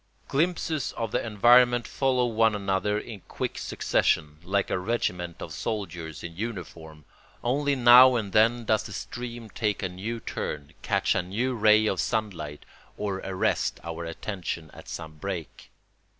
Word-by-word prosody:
Glimpses 160 -1 0
of 115 -2 -3
the - - 0
environment 120 +2 +5
follow 130 -2 +1
one 110 -2 +2
another 100 +1 0
in 105 0 -7
quick - - -4
succession, 75 0 0
like 100 +2 0
a - - +1
regiment 90 -5 -2
of - - -7
soldiers 90 -8 -4
in 85 -1 -7
uniform; 85 -7 -7 0.4
only 140 +3 +1
now 125 0 +8
and 105 -5 -2
then 115 +2 +4
does 110 0 +2
the - - -8
stream 120 -2 -6
take 105 -4 -1
a 95 - -1
new 105 +6 -5
turn, 70 -9 -5
catch - - +1
a - - +1
new 110 +9 -2
ray 110 -1 +5
of 95 -4 0
sunlight, 90 -10 -3 0.3
or 100 -2 -2
arrest 95 -1 -1
our 85 0 -5
attention 85 -2 -5
at - - -12
some 80 -1 -7
break. 90 -1 -6
105 Hz, 150 wpm, -27 LUFS, 90-120 Hz, 0.4 s, now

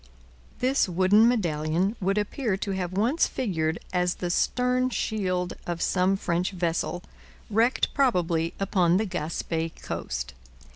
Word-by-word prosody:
This 255 -5 +2
wooden 190 +5 +5
medallion 175 -3 0
would 195 +2 +1
appear 210 0 -1
to 200 - -3
have 185 -2 -3
once 235 - +2
figured 165 -9 -1 0.2
as 180 0 +1
the 175 -1 -3
stern 250 +6 +1
shield 185 -7 -1
of 175 -1 -2
some 185 +2 +2
French 175 -1 0
vessel, 175 0 -1 0.5
wrecked 230 +5 +2
probably 175 - +1
upon 185 -3 +2
the 220 - +1
Gaspe 165 -2 -3
coast. 65 +3 -4
185 Hz, 130 wpm, -26 LUFS, 170-215 Hz, 0.5 s, wooden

